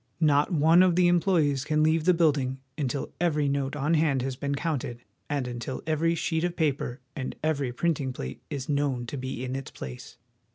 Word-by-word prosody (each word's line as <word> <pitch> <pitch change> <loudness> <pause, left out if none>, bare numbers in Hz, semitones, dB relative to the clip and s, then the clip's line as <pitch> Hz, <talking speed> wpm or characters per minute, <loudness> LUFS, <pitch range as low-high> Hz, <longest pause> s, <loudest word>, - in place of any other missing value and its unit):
Not 150 -1 +3
one 165 +2 +5
of 185 -2 +4
the 180 0 +5
employees 165 -6 +2
can 155 +1 +1
leave 160 0 +2
the 180 - +6
building 145 -6 +2 0.2
until 140 -2 -3
every 150 -4 +2
note 140 0 -1
on 145 +3 0
hand 150 -5 +2
has 130 -1 -2
been 140 +1 -2
counted 140 -6 -3 0.3
and 140 -3 -1
until 120 +1 -5
every 165 +1 +1
sheet 160 0 -1
of 175 0 -1
paper 140 -5 -1
and 130 -2 -4
every 145 -5 0
printing 140 0 0
plate 65 - -7
is 140 -4 -4
known 140 -4 0
to 120 - -6
be 130 -1 -4
in 130 +1 -3
its 135 -1 -5
place. 65 -1 -9
145 Hz, 195 wpm, -27 LUFS, 130-160 Hz, 0.3 s, the